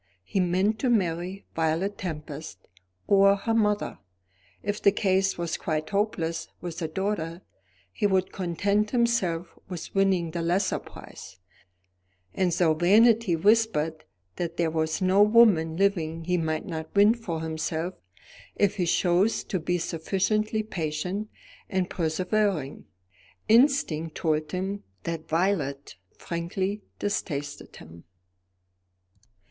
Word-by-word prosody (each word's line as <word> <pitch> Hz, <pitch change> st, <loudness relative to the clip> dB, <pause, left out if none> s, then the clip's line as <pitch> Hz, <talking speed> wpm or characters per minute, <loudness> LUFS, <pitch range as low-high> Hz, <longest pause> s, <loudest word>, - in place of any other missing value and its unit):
He 195 Hz, -, -2 dB
meant 185 Hz, +4 st, +1 dB
to 255 Hz, -, +1 dB
marry 185 Hz, -3 st, -1 dB
Violet 165 Hz, +5 st, 0 dB
Tempest 155 Hz, -, -7 dB, 0.4 s
or 195 Hz, 0 st, +5 dB
her 215 Hz, +3 st, -2 dB
mother. 210 Hz, -2 st, +1 dB, 0.6 s
If 205 Hz, +1 st, -2 dB
the 200 Hz, -, +6 dB
case 195 Hz, -1 st, +1 dB
was 170 Hz, -1 st, -2 dB
quite 155 Hz, +1 st, -3 dB
hopeless 170 Hz, -6 st, -1 dB
with 170 Hz, -1 st, -6 dB
the 160 Hz, -, -2 dB
daughter, 170 Hz, -1 st, -3 dB, 0.5 s
he 205 Hz, -, +1 dB
would 190 Hz, -2 st, +1 dB
content 200 Hz, +4 st, 0 dB
himself 205 Hz, -9 st, 0 dB
with 180 Hz, -3 st, -7 dB
winning 190 Hz, -4 st, +2 dB
the 170 Hz, +1 st, -3 dB
lesser 180 Hz, +4 st, +1 dB
prize; 95 Hz, -, -12 dB, 1.0 s
and 185 Hz, -2 st, +1 dB
though 165 Hz, -1 st, +3 dB
Vanity 210 Hz, +4 st, +4 dB
whispered 170 Hz, -5 st, +2 dB, 0.3 s
that 170 Hz, -1 st, -3 dB
there 165 Hz, -2 st, +1 dB
was 160 Hz, +3 st, -1 dB
no 190 Hz, +2 st, +4 dB
woman 205 Hz, -7 st, +5 dB
living 165 Hz, -5 st, 0 dB
he 180 Hz, +2 st, 0 dB
might 160 Hz, -2 st, -1 dB
not 160 Hz, -2 st, -5 dB
win 205 Hz, +2 st, +6 dB
for 180 Hz, -9 st, -5 dB
himself 160 Hz, +2 st, -3 dB, 0.6 s
if 205 Hz, 0 st, +1 dB
he 180 Hz, -3 st, 0 dB
chose 180 Hz, +5 st, +2 dB
to 185 Hz, -, -2 dB
be 175 Hz, +2 st, 0 dB
sufficiently 200 Hz, +6 st, -1 dB
patient 180 Hz, +2 st, -3 dB, 0.4 s
and 190 Hz, -3 st, -1 dB
persevering, 180 Hz, -2 st, -1 dB, 0.6 s
instinct 220 Hz, -, +3 dB
told 155 Hz, -2 st, -1 dB
him 190 Hz, +2 st, -3 dB, 0.2 s
that 165 Hz, -1 st, -5 dB
Violet 160 Hz, -5 st, -1 dB, 0.2 s
frankly 185 Hz, +4 st, -3 dB, 0.2 s
detested 145 Hz, -8 st, -4 dB
him. 80 Hz, +1 st, -13 dB
180 Hz, 120 wpm, -26 LUFS, 160-205 Hz, 1.0 s, the